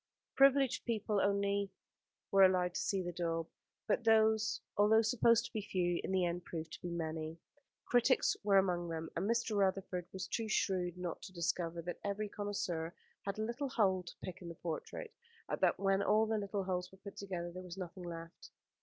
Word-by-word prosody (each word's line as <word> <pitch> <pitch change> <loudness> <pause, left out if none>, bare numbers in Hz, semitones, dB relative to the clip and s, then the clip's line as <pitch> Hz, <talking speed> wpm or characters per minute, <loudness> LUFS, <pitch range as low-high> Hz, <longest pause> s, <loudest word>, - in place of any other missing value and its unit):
Privileged 270 -1 +5
people 215 -3 0
only 200 0 +1 0.6
were 195 - +5
allowed 180 -1 +4
to - - -1
see 195 -2 0
the 175 - -3
daub; 165 -1 -1 0.4
but - - +1
those, 220 0 +4 0.2
although 220 +2 +5
supposed 230 0 +4
to - - -9
be 215 - -1
few, 175 -3 0
in - - -3
the 185 -2 +3
end 175 +1 -2
proved 165 -2 -6
to - - -8
be 175 - -4
many. 160 -1 -3 0.5
Critics 245 +2 +3
were 200 -1 +5
among 175 -3 +2
them, 160 0 -4
and 190 +5 -1
Mr. 230 -2 +1
Rutherford 190 -2 0
was 190 -1 -4
too 225 +4 -2
shrewd 180 -4 0
not 180 -2 -4
to 190 - -10
discover 170 -1 -1
that 175 +1 -5
every 205 +1 -2
connoisseur 180 -5 -3 0.3
had 200 - -2
a 215 - -1
little 240 +5 -2
hole 195 -7 +2
to 175 - -11
pick 185 0 -6
in 175 - -7
the 170 - -7
portrait, 175 - -5 0.3
and - - -3
that - - +4
when 195 0 +2
all 215 +2 +4
the 220 0 0
little 200 -1 -2
holes 180 -1 -2
were 190 - -15
put 200 +1 -10
together 180 -3 -4
there 185 +1 -7
was 180 0 -8
nothing 185 0 -6
left. 165 0 -8
190 Hz, 200 wpm, -35 LUFS, 175-210 Hz, 0.6 s, Privileged